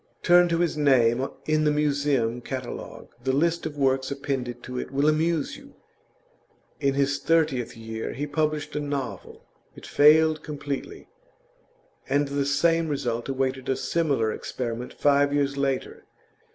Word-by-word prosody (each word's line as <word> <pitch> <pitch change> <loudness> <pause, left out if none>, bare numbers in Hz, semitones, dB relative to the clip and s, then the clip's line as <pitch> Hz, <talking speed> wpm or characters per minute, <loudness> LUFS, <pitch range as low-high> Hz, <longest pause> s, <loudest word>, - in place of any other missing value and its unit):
Turn 175 0 +6
to 165 - +1
his 170 -2 0
name 130 -3 +3 0.2
in 155 0 +2
the 150 - +3
Museum 140 -5 +1
Catalogue; 130 -1 -7
the 130 - +1
list 165 +5 +1
of 150 -2 -9
works 130 -1 +1
appended 135 -3 -4
to 125 0 -5
it - - -5
will 140 +2 +1
amuse 155 0 +1
you. 280 0 -16 1.0
In 140 -2 +1
his 140 0 +1
thirtieth 150 -8 +1
year 110 0 -5
he 145 +4 -3
published 150 0 -2
a - - 0
novel; 140 -8 -5 0.3
it - - -12
failed 155 +1 +5
completely, 150 - -6 1.0
and 145 +1 +1
the 140 0 -1
same 165 +3 +2
result 120 -4 -2
awaited 130 -1 -2
a 130 - +2
similar 140 -11 0
experiment 120 -1 -5
five 145 0 +3
years 140 -1 0
later. 135 -2 -2
140 Hz, 145 wpm, -25 LUFS, 130-155 Hz, 1.0 s, Turn